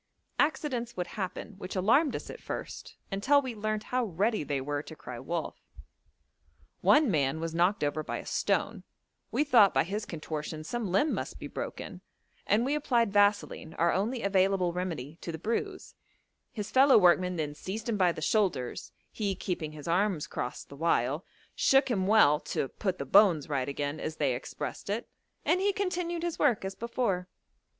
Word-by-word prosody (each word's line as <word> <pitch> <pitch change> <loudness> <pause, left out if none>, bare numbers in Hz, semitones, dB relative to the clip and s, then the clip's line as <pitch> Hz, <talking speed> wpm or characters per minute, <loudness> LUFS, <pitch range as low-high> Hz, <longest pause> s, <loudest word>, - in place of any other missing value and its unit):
Accidents 260 -7 0
would 180 - -1
happen, 190 +3 -5
which 185 - -6
alarmed 240 - +3
us - - -6
at - - -10
first, - - -6 0.2
until 240 +9 +4
we 260 -3 -4
learnt 215 0 -2
how 255 -1 +2
ready 205 +1 0
they 145 -1 -1
were 145 +2 -2
to 160 - -11
cry 125 -5 -8
wolf: 165 +5 -4 1.2
one 295 -6 +5
man 145 -2 +1
was 165 0 -3
knocked 175 +2 +2
over 145 +1 0
by - - -4
a - - -8
stone; - - 0 0.5
we - - +1
thought 235 -9 +5
by - - +4
his 205 +5 -4
contortions 155 -1 -5
some 235 -6 -3
limb 245 - +2
must - - -4
be - - -8
broken, - - -6 0.5
and 220 +4 +3
we 275 - 0
applied 240 -8 +1
vaseline, 205 -5 +2
our 170 +1 +2
only 225 +6 -1
available 190 -2 +2
remedy, 165 -5 -4
to 170 - -4
the 160 - -5
bruise; 305 - -3 0.6
his 210 -6 -5
fellow 270 +1 +7
workmen 180 -1 +4
then 150 -3 -2
seized 205 +9 -6
him 230 - 0
by 185 -3 +3
the 155 - -6
shoulders, 180 - 0 0.2
he 200 -3 -2
keeping 165 -4 -4
his 150 0 -9
arms 175 -2 +1
crossed 125 -4 -5
the 140 - -10
while, 145 0 +1 0.3
shook 270 -1 +3
him 190 -4 0
well 175 -9 +6
'to 135 - -3
put 190 -3 -2
the 140 - -4
bones 175 -2 +5
right 140 -3 -1
again,' 145 +2 -3
as 155 - -4
they 140 -4 +1
expressed 125 +9 -6
it, 220 +4 -2 0.4
and 365 - +3
he 405 +1 +3
continued 355 -3 -2
his 345 -2 -3
work 240 -9 +2
as 190 - -3
before. 230 -5 -2
190 Hz, 180 wpm, -29 LUFS, 155-235 Hz, 1.2 s, fellow